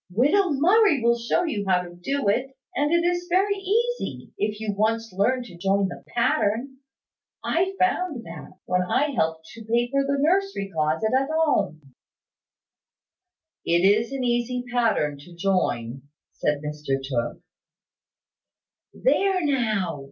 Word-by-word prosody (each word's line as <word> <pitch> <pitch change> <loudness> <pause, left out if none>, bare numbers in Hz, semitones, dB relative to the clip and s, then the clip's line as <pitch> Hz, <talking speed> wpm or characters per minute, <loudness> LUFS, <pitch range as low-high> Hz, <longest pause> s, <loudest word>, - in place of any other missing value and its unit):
Widow 290 - +3
Murray 330 - +4
will 235 0 +3
show 235 +9 0
you 215 - -2
how 180 -1 +3
to 175 -1 -10
do 270 +9 -2
it; 260 +6 0 0.2
and 295 +2 +1
it 340 0 +3
is 350 0 0
very 385 +3 +3
easy, 455 +5 -2
if 210 - -1
you 215 -2 -2
once 225 0 0
learn 250 +7 +1
to 180 -7 -12
join 195 +2 +1
the - - -9
pattern. 240 +2 0 0.7
I 375 +3 0
found 365 -8 0
that, 165 +2 -10
when 180 0 +1
I 280 +11 +1
helped 160 -9 -1
to 230 - -11
paper 240 +5 +1
the 280 0 0
nursery 340 - +1
closet 160 +7 0
at 270 +2 +1
home." 225 - 0 1.7
"It 170 +2 +2
is 215 +5 +3
an 270 -1 -3
easy 245 +1 0
pattern 215 -12 +1
to 170 +5 -14
join," 135 -10 -1 0.3
said 150 0 -1
Mr 150 -2 -2
Tooke. 130 -3 -3 1.5
"There 390 -7 +2
now! 220 - 0
235 Hz, 140 wpm, -24 LUFS, 180-295 Hz, 1.7 s, Murray